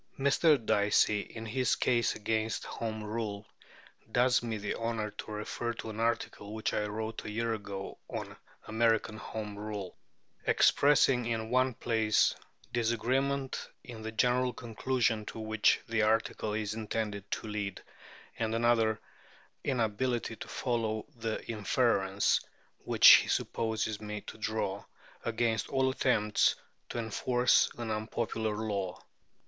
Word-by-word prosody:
Mr. 145 +3 +4
Dicey 105 0 +3
in 115 +2 -7
his 125 +3 +1
Case 120 -2 +2
against 110 -1 -1
Home 110 -2 -4
Rule 105 -1 -4 0.7
does 125 +1 +4
me 115 -2 -3
the 100 0 -3
honour 115 -2 -2
to 110 - -8
refer 105 +3 -3
to 115 -1 -6
an 110 - -7
article 115 -2 -1
which 110 - -1
I 105 - 0
wrote 110 +1 -4
a - - -6
year 115 +2 -1
ago 100 -2 -6
on - - -6 0.3
"American 110 -1 +1
Home 105 -1 -6
Rule," 105 -3 -5 0.5
expressing 135 -4 +4
in 110 -1 -2
one 130 -1 +3
place 110 -2 +2 0.4
"disagreement 130 +4 0
in 115 -3 -9
the 110 0 -5
general 125 +2 +2
conclusion 115 -1 0
to - - -6
which 110 -1 +3
the 115 -1 +1
article 110 0 +1
is 105 -1 -2
intended 105 -2 -3
to - - -3
lead," 105 -2 -4 0.6
and 110 -1 0
in 115 - -1
another 115 -2 +3 0.6
"inability 120 -1 0
to - - -8
follow 115 -3 -1
the 115 -1 -3
inference" 105 -3 +2 0.4
which - - +6
he - - +10
supposes 110 -2 -1
me 105 0 -5
to 110 - -10
draw 110 -2 -2 0.4
"against 115 -1 0
all 130 -1 +2
attempts 105 -6 +2 0.3
to - - -5
enforce 120 +2 +2
an 120 -2 -3
unpopular 110 0 -2
law." 100 -4 -2
110 Hz, 135 wpm, -31 LUFS, 105-120 Hz, 0.7 s, he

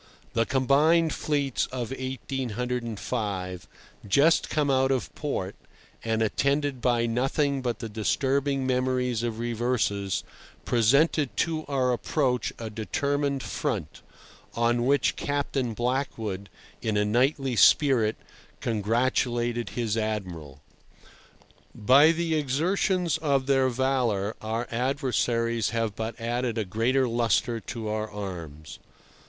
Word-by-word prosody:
The 115 -1 +1
combined 150 +5 +3
fleets 140 -4 -1
of 125 -2 -5
1805, 120 -7 -3 0.4
just 140 +11 +4
come 150 -2 +1
out 130 0 +3
of 130 - -1
port, - - -3 0.5
and 110 0 +1
attended 140 +3 0
by 120 -1 +2
nothing 135 +4 0
but 120 -2 -2
the 115 - -5
disturbing 135 +5 0
memories 125 -2 0
of 115 -2 -3
reverses, 115 -4 -1 0.4
presented 130 +1 +2
to 160 -1 -1
our 130 -3 +1
approach 125 0 0
a 115 -2 -6
determined 140 +5 -1
front, - - -3 0.5
on 120 +1 +1
which 140 +1 +2
Captain 140 -4 -2
Blackwood, 115 -5 -2 0.3
in 110 -2 0
a 105 - +2
knightly 130 +4 +1
spirit, 115 -4 +4 0.4
congratulated 120 +2 0
his 115 -3 -2
Admiral. 90 -11 -4 1.1
By 140 +8 +6
the 165 0 -1
exertions 165 +4 +1
of 140 -4 +1
their 135 -1 +3
valour 120 -5 0
our 115 +2 -3
adversaries 120 -3 0
have 115 -3 -1
but 110 +1 -5
added 120 0 -2
a 110 - 0
greater 120 +7 +1
lustre 115 0 +1
to 110 +2 -6
our 110 0 -2
arms. 85 -7 -7
125 Hz, 115 wpm, -27 LUFS, 110-135 Hz, 1.1 s, By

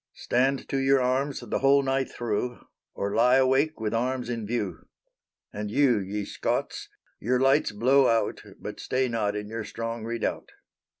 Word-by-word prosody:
Stand 130 +2 0
to 135 - -1
your 135 0 +4
arms 130 +2 0
the - - -2
whole 140 +1 +4
night 135 0 0
thro' 120 +1 -3 0.3
Or 100 0 -2
lie 125 +2 +4
awake 135 +3 +2
with 110 -1 -2
arms 125 +1 -1
in 115 -3 -4
view. 105 -7 -3 0.7
And 105 0 -4
you, 125 -1 +3
ye 100 +1 -4
Scots, - - -3 0.3
your 125 +3 +1
lights 135 +1 +3
blow 130 +6 +4
out, 115 -1 +1 0.2
But - - -7
stay 130 0 0
not 110 -4 -1
in 105 0 -4
your 110 +1 -5
strong 115 +1 -5
redoubt. 115 0 -3
120 Hz, 165 wpm, -26 LUFS, 110-135 Hz, 0.7 s, your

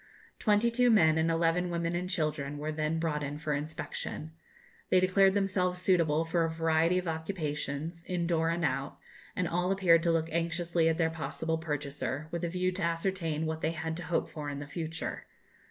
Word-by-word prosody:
Twenty 215 +2 +3
two 245 +1 +4
men 160 -8 +5
and 160 +1 +2
eleven 165 +2 +2
women 170 0 -1
and 180 +1 -2
children 150 -5 -1
were 150 +1 -3
then 155 +1 -1
brought 160 -2 -1
in 145 0 -4
for 150 -1 -2
inspection. 155 +1 -4 0.6
They 185 - +5
declared 190 +1 +4
themselves 185 -2 +1
suitable 165 -4 +2
for 165 +1 +1
a 165 - +1
variety 165 +2 +2
of 180 -1 -2
occupations, 160 -1 -3
in 175 -2 -1
door 165 -1 +1
and 170 0 0
out, 135 0 -2 0.4
and 180 - 0
all 180 +3 0
appeared 180 -4 +5
to 170 0 +2
look 165 0 +1
anxiously 170 0 +1
at 160 - 0
their 165 -2 +2
possible 160 0 -3
purchaser, 145 -1 -3
with 170 0 -3
a 170 - 0
view 180 +1 0
to 185 +1 -5
ascertain 165 -2 -1
what 160 0 -3
they 160 - 0
had 160 0 -3
to 175 - -6
hope 175 - 0
for 150 -2 -6
in 140 - -4
the 145 - -5
future. 165 +2 -5
165 Hz, 195 wpm, -30 LUFS, 155-180 Hz, 0.6 s, men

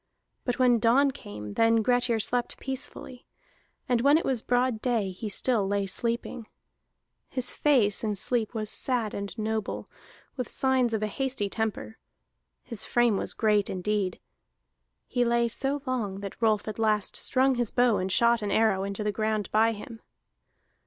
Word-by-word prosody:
But 245 - -1
when 245 -2 +4
dawn 260 +5 +4
came, 105 - -9
then 225 0 +3
Grettir 245 -1 +2
slept 245 +3 -1
peacefully; 265 -1 -5 0.6
and 245 -2 +2
when 285 +4 +5
it 330 - -2
was 255 -4 0
broad 245 -2 0
day 225 -6 0
he 210 +4 -6
still 210 0 +1
lay 200 0 0
sleeping. 235 +3 -2 0.8
His 255 -2 -3
face 235 -10 +3
in 210 -2 -1
sleep 230 +3 0
was 215 -1 -3
sad 240 -5 -2
and 200 +2 -5
noble, 220 -1 -3 0.5
with 250 - -3
signs 260 -3 +1
of 215 - -2
a - - +2
hasty 250 -3 -2
temper; 220 0 -3 0.6
his 230 -5 -2
frame 240 -3 +2
was - - -2
great 210 -3 +2
indeed. 190 0 -2 0.9
He 245 - 0
lay 235 0 +2
so 270 +4 -1
long 215 -7 -2
that 200 +3 -8
Rolf 215 -2 +2
at 215 - -5
last 215 -2 +1
strung 265 0 +2
his 240 -3 -1
bow 245 -3 +3
and 185 +1 -2
shot 235 +3 +3
an 205 - -2
arrow 200 -2 +2
into 200 +2 -4
the 210 - 0
ground 215 0 -2
by 220 +1 +4
him. 225 +1 -9
225 Hz, 165 wpm, -27 LUFS, 210-245 Hz, 0.9 s, when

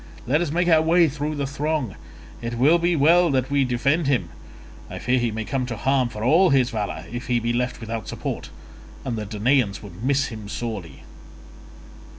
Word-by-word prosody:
Let 150 +6 +2
us 175 - -1
make 175 +3 0
our 160 -2 +5
way 165 +1 +4
through 150 +1 -3
the 140 -1 -2
throng; 140 -4 -2 0.5
it 120 0 -4
will 150 +8 +5
be 170 +1 +1
well 170 +4 +5
that 130 -1 0
we 140 -1 +3
defend 135 +5 +1
him; 135 -4 +1 0.6
I - - -7
fear 125 +1 +1
he 120 -1 0
may 110 0 -4
come 130 0 -2
to 120 -3 -4
harm 130 +2 +1
for 110 -1 -6
all 165 +9 +5
his 130 -2 +3
valour 105 -3 -4
if 120 +1 -6
he 120 -1 +2
be 120 +1 -1
left 125 +1 -1
without 115 -1 -5
support, - - -5 0.6
and 125 -3 -2
the 105 -2 -5
Danaans 110 -1 +1
would 100 +1 -10
miss 140 +2 +1
him 110 -3 -8
sorely." 100 - -6
130 Hz, 195 wpm, -23 LUFS, 115-150 Hz, 0.6 s, our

